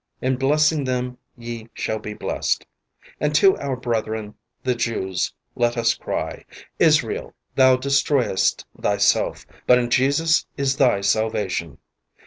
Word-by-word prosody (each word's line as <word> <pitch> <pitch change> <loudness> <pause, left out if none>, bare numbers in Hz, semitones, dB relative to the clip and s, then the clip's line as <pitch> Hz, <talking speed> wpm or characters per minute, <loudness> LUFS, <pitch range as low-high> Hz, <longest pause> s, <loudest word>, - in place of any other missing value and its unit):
In 130 0 0
blessing 150 +2 +2
them 125 -1 -2 0.2
ye 115 -1 -7
shall 110 - -2
be 105 0 -7
blessed.'' - - -2 0.5
And 150 0 0
to 195 +3 +6
our 140 -2 -2
brethren, 110 -3 -3 0.3
the 130 - +1
Jews, 110 -6 -2 0.2
let 120 0 +1
us 115 0 +3
cry: 120 - -4 0.4
"Israel, - - +2 0.2
thou 130 -1 +6
destroyest 140 -5 +1
thyself, 100 0 +1 0.2
but 125 - +7
in 120 -1 -1
Jesus 145 +6 +2
is 135 -1 0
thy 125 -8 +3
salvation." 100 -7 -1
125 Hz, 125 wpm, -22 LUFS, 110-135 Hz, 0.5 s, but